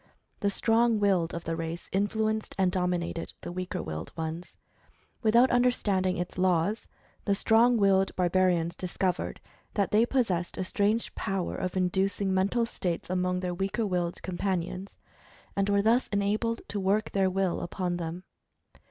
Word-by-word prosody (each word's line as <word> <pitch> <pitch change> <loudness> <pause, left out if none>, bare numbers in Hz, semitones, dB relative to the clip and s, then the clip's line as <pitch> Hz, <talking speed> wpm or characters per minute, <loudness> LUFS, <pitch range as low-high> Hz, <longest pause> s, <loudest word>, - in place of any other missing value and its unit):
The 200 - +1
strong 225 +2 +2
willed 190 -5 +2
of 170 - -5
the 165 - -2
race 165 +1 -5
influenced 215 +2 0
and 190 -2 +3
dominated 180 -2 -2
the - - -6
weaker 185 +1 -4
willed 80 0 -5
ones. 160 +2 -5 0.6
Without 235 +3 +5
under 245 +1 +4
standing 190 -6 0
its 175 +1 -4
laws, 185 +4 +1 0.4
the 200 - +2
strong 230 +4 +4
willed 195 -2 +3
barbarians 180 -2 +2
discov 185 0 -1
ered - - -5 0.4
that 200 -3 +1
they 220 +3 +4
possessed 190 -11 0
a - - -1
strange 210 +4 0
power 195 -2 -2
of 185 +1 -3
inducing 190 +1 +1
mental 200 +5 +2
states 180 -6 -3
among 180 0 0
their 180 -1 -2
weaker 195 +5 -1
willed 175 -3 -2
companions, 185 +1 -3 0.6
and 195 0 +1
were 200 0 +3
thus 235 +4 +3
enabled 210 +3 0
to 205 - -2
work 200 +3 +1
their 195 -1 +2
will 190 -1 0
upon 175 0 -2
them. 170 +1 -5
190 Hz, 155 wpm, -28 LUFS, 180-205 Hz, 0.6 s, Without